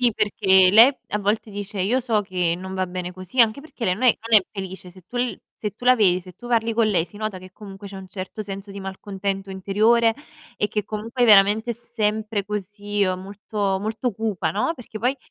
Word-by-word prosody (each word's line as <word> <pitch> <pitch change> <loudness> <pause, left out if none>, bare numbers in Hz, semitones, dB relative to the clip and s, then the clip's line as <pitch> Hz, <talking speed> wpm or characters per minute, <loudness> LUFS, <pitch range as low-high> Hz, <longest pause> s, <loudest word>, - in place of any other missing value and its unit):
Sì, 245 -2 +4
perché 190 -3 +4
lei 235 +7 +7
a 210 - -1
volte 210 +2 -1
dice: 205 0 -5
"Io 225 +8 +1
so 230 -4 +1
che 180 -4 0
non 190 +1 -7
va 185 0 -1
bene 180 0 -5
così." 185 +7 -2
Anche 230 +3 +4
perché 280 -5 -8
lei 180 - +2
non 215 - -8
è 245 - +5
non 220 - +8
è - - -13
felice. 190 -2 -7
Se 185 +1 -16
tu 245 - -10
l 245 0 -1 0.2
se 210 - -4
tu 245 - -12
la 255 0 +6
vedi, 185 -5 +3
se 185 0 -13
tu 240 - -12
parli 230 -1 +1
con 230 -1 +3
lei 185 -6 +2
si 205 - -14
nota 215 -2 -4
che 185 0 -13
comunque 200 0 -10
c'è 195 - -9
un 190 -1 -9
certo 190 +3 -6
senso 195 0 -7
di 200 - -7
malcontento 195 0 -4
interiore, 215 +4 +2 0.4
e 210 - 0
che 210 -1 -2
comunque 230 +4 -2
veramente 210 +1 +5
è - - -10
sempre 215 -2 -2
così, 205 0 -2
uhm, 185 -1 -1
molto 200 0 -2
molto 225 +4 -2
cupa, 200 -6 -2
no, 215 - 0
perché 225 -5 -9
poi 255 +4 +1
205 Hz, 225 wpm, -23 LUFS, 190-225 Hz, 0.4 s, non